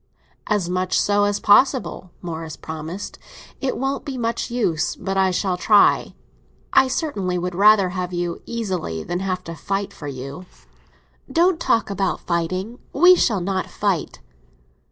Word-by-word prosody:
"As 205 -5 +1
much 185 +1 0
so 205 0 +2
as 205 0 0
possible," 240 -3 +3
Morris 160 -2 -6
promised. 160 +5 -7 0.4
"It 270 -2 -2
won't 270 +2 -2
be 275 -3 -5
much 230 0 -2
use, 180 -10 0
but 195 +1 -4
I 190 -1 +3
shall 185 0 0
try. 205 +2 +4 0.6
I 265 - +6
certainly 205 - -2
would 180 +1 -3
rather 200 0 +5
have 180 0 -4
you 175 -1 -3
easily 185 - -3
than 175 - -3
have 185 -1 -2
to 165 - -7
fight 195 +5 -3
for 145 - -8
you." 140 +6 -7 0.8
"Don't 345 0 +3
talk 225 -8 +1
about 195 -1 -1
fighting; 185 +7 -2
we 355 +5 +7
shall 215 - +1
not 185 +1 -2
fight." 200 -5 -2
190 Hz, 150 wpm, -22 LUFS, 175-220 Hz, 0.8 s, we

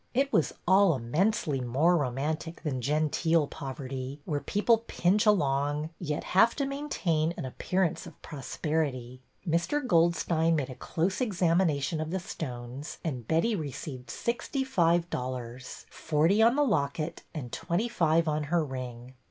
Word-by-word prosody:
It 275 +2 +1
was 160 - +3 0.2
all 190 -2 +5
immensely 150 - 0
more 140 +9 +3
romantic 155 +4 -2
than 135 -6 -2
genteel 155 +3 +2
poverty, 135 0 -6
where 150 -4 -1
people 215 +7 +2
pinch 205 +5 +2
along, 145 -4 +2
yet 150 -4 -3
have 225 +5 +4
to 280 - 0
maintain 180 - -1
an - - -4
appearance 180 +6 -1
of - - -13
prosperity. 135 -3 -3 0.2
Air. 170 - +1
Goldstein 170 - +2
made 140 -4 -2
a - - -5
close 175 - -1
examination 170 - +1
of 155 - -3
the 190 +3 -1
stones, 135 - -6
and 125 -8 -4
Betty 170 +8 +2
received 140 -5 -6
sixty 245 - -2
five 170 -8 +2
dollars, 125 0 -5
— - - -30
forty 165 +7 +2
on 230 +3 +5
the 295 - +3
locket 155 - -1
and 125 -6 -5
twenty 185 +8 -1
five 165 -6 +2
on 150 -1 0
her 165 +1 +1
ring. 125 -2 -7
160 Hz, 145 wpm, -29 LUFS, 135-180 Hz, 0.2 s, all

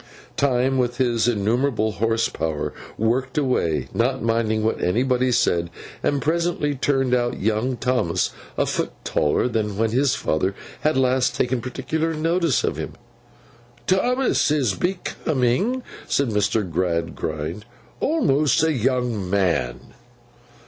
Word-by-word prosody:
Time, 130 -1 +2
with 120 -1 0
his 120 -3 +2
innumerable 110 +1 +1
horse 115 +2 +1
power, 75 -2 -3 0.2
worked 125 +5 0
away, 85 - +1
not 130 +2 0
minding 115 -1 +1
what 110 - 0
anybody 125 +6 +2
said, 85 -7 +2 0.3
and 145 -1 0
presently 165 -2 0
turned 135 -2 +1
out 120 -1 +1
young 110 +5 0
Thomas 120 -10 0 0.3
a - - +2
foot - - -2
taller 75 - +1
than 105 -4 -2
when 110 0 +1
his 130 +2 +2
father 95 +5 0 0.2
had 155 -2 +1
last 130 -1 +2
taken 125 -1 0
particular 160 +6 -2
notice 165 -1 +1
of - - -1
him. - - -5 0.9
'Thomas 245 +6 +2
is 140 -9 +2
becoming,' 175 - 0 0.2
said 140 -3 +1
Mr. 105 -1 +1
Gradgrind, 85 +1 -2 0.4
'almost 150 - +2
a 160 0 +3
young 125 -6 0
man. 90 -11 0
125 Hz, 125 wpm, -23 LUFS, 105-140 Hz, 0.9 s, a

